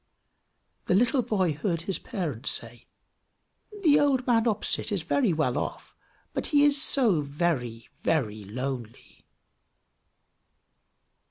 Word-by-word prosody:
The 180 Hz, -, +3 dB
little 245 Hz, +5 st, +3 dB
boy 195 Hz, -8 st, 0 dB
heard 165 Hz, +2 st, -2 dB
his 195 Hz, +1 st, -3 dB
parents 170 Hz, -, -3 dB
say, 115 Hz, 0 st, -3 dB, 1.0 s
"The 295 Hz, -4 st, +6 dB
old 270 Hz, -3 st, +2 dB
man 235 Hz, -1 st, +3 dB
opposite 215 Hz, 0 st, -1 dB
is 195 Hz, -6 st, -1 dB
very 225 Hz, -, +1 dB
well 155 Hz, -6 st, 0 dB
off, -, -, -6 dB, 0.4 s
but -, -, -2 dB
he 290 Hz, -1 st, +4 dB
is 285 Hz, -1 st, +3 dB
so 225 Hz, -, +3 dB
very, 140 Hz, -6 st, -2 dB
very 110 Hz, -10 st, -1 dB
lonely!" 120 Hz, +2 st, -7 dB
175 Hz, 115 wpm, -27 LUFS, -, 1.0 s, The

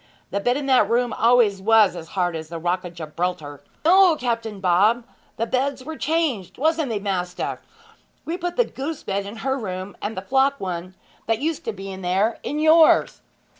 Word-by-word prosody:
The 200 Hz, -, -1 dB
bed 245 Hz, +5 st, +1 dB
in 290 Hz, -, -4 dB
that 255 Hz, -6 st, +4 dB
room 240 Hz, 0 st, +1 dB
always 230 Hz, -4 st, +3 dB
was 215 Hz, -2 st, +4 dB
as 165 Hz, -2 st, -8 dB
hard 175 Hz, -2 st, +1 dB
as 160 Hz, -1 st, -6 dB
the 170 Hz, -, -5 dB
Rock 175 Hz, +3 st, -1 dB
of 175 Hz, -1 st, -9 dB
Gibraltar!' 155 Hz, -2 st, -4 dB, 0.2 s
'No, 365 Hz, 0 st, +6 dB
Captain 230 Hz, -6 st, -3 dB
Bob! 200 Hz, +6 st, +3 dB, 0.3 s
The 230 Hz, -, 0 dB
beds 260 Hz, +2 st, -1 dB
were 320 Hz, +4 st, -6 dB
changed 280 Hz, -, -1 dB
wasn't 315 Hz, 0 st, +1 dB
they 225 Hz, -, -1 dB
maister? 185 Hz, -3 st, -3 dB, 0.6 s
We 330 Hz, -, -2 dB
put 355 Hz, -1 st, -4 dB
the 485 Hz, -, +3 dB
goose 290 Hz, -1 st, -6 dB
bed 200 Hz, 0 st, -2 dB
in 205 Hz, -, -8 dB
her 265 Hz, 0 st, +1 dB
room, 185 Hz, -2 st, -5 dB
and 210 Hz, 0 st, -4 dB
the 190 Hz, -, -4 dB
flock 270 Hz, +1 st, +2 dB
one, 185 Hz, 0 st, -5 dB, 0.3 s
that 225 Hz, 0 st, +2 dB
used 310 Hz, +5 st, -2 dB
to 225 Hz, -, -1 dB
be 195 Hz, -1 st, -7 dB
there, 190 Hz, +4 st, 0 dB
in 295 Hz, -, -4 dB
yours.' 315 Hz, +1 st, +4 dB
220 Hz, 190 wpm, -23 LUFS, 185-275 Hz, 0.6 s, No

